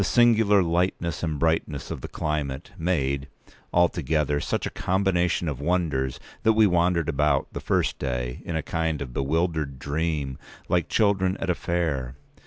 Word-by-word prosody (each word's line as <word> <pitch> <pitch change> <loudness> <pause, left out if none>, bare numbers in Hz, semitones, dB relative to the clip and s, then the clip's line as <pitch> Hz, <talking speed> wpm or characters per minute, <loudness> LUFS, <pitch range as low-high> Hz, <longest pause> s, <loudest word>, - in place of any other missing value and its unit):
192singular 110 -2 +4
lightness 85 -1 0
and 80 -3 -1
brightness 80 -2 0
of - - -5
the - - -5
climate—made, 70 -1 -2 0.4
altogether, 80 -4 +2
such - - -2
a - - -3
combination 90 -2 +1
of 70 -3 -3
wonders 75 -6 0 0.2
that 110 0 +4
we 110 0 +5
wandered 85 -3 +2
about, 75 -2 +2
the - - -3
first - - 0
day, 60 -2 -3
in 85 - -4
a 80 - -1
kind 80 -2 -1
of 60 -3 -9
bewildered 75 0 0
dream, 70 -1 -2 0.3
like 85 -3 +1
children 95 -3 +2
at 95 - -1
a - - +2
fair. 75 -8 -2
80 Hz, 150 wpm, -25 LUFS, 70-90 Hz, 0.4 s, we